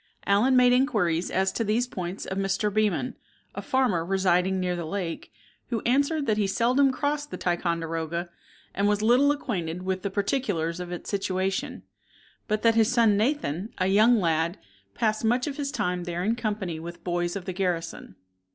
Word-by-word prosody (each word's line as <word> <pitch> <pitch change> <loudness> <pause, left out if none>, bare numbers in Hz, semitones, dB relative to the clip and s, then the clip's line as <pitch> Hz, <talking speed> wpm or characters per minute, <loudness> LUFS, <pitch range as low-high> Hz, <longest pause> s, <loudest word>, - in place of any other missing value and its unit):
Allen 215 +7 +3
made 250 -1 +6
inquiries 180 - +1
as 190 +1 +1
to 230 - -1
these 225 +3 +1
points 185 -5 -5
of 190 - -3
Mr. 195 +1 0
Beman, 215 +3 +1 0.4
a - - -5
farmer 250 -11 +1
residing 190 0 +1
near 180 -1 -1
the 175 - -4
lake, 165 0 -4 0.4
who 235 -3 -1
answered 280 +5 +1
that 215 -3 +1
he 205 - +2
seldom 250 +7 +3
crossed 290 +2 -2
the - - -6
Ticonderoga, 170 -1 -2 0.5
and 200 +2 +1
was 210 0 +1
little 250 +6 +5
acquainted 180 - -3
with 190 0 -2
the 200 - -2
particulars 195 -5 -1
of 180 0 -6
its 175 - -6
situation; 190 -1 -2 0.6
but 215 -1 -1
that 230 -1 +5
his 225 +1 +3
son, 230 -4 +4
Nathan, 215 - -1
a 185 - +1
young 215 +5 +5
lad, 165 0 0 0.4
passed 215 0 0
much 245 +3 +2
of 290 -1 -4
his 280 -1 -2
time 180 -10 -2
there 175 0 -3
in 220 +4 +1
company 205 -8 -3
with 170 +1 -7
the 170 - -25
boys 175 0 -2
of 190 -3 -5
the 185 - -4
garrison. 175 - -3
195 Hz, 180 wpm, -26 LUFS, 175-235 Hz, 0.6 s, made